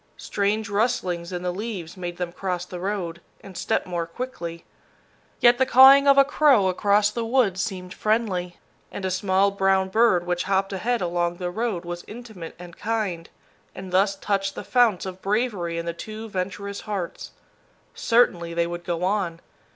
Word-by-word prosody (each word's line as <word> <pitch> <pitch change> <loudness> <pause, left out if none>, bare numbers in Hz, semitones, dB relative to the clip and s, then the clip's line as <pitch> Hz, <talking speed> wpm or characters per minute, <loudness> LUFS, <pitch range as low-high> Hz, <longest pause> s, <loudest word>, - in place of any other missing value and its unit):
Strange 210 +1 -1
rustlings 195 -5 -1
in 180 -1 -4
the 180 0 -1
leaves 190 -5 -5
made 175 -2 -6
them 180 -1 -3
cross 180 -1 -3
the 180 0 -8
road, 180 -3 -3 0.2
and 195 - -12
step - - -1
more 175 -2 -3
quickly. 170 -5 -6 0.7
Yet 240 0 +5
the 260 - +4
cawing 270 +2 +8
of 275 0 +6
a 275 - +7
crow 275 -9 +4
across 205 +2 +2
the 235 +1 -3
woods 225 -6 +1
seemed 185 -4 -5
friendly, 205 -5 -1 0.3
and 195 - -5
a 185 - -1
small 190 +1 +2
brown 195 -1 +2
bird 190 -4 +3
which 175 0 -1
hopped 195 +1 0
ahead 235 +5 -1
along 175 0 -1
the 175 0 -4
road 210 -4 -2
was 175 0 -6
intimate 215 -7 -9
and 175 -1 -11
kind, 205 -7 -3 0.5
and 185 0 -8
thus 195 +2 +3
touched 195 0 -1
the - - -6
founts 235 -8 +2
of 185 0 -7
bravery 200 -5 -1
in 170 - -3
the 170 - -2
two 215 +6 -8
venturous 200 +1 -4
hearts. 200 -5 -5 0.6
Certainly 175 -8 +2
they 170 0 +2
would 175 0 -6
go 175 0 -3
on. 185 -4 -1
190 Hz, 175 wpm, -24 LUFS, 175-215 Hz, 0.7 s, cawing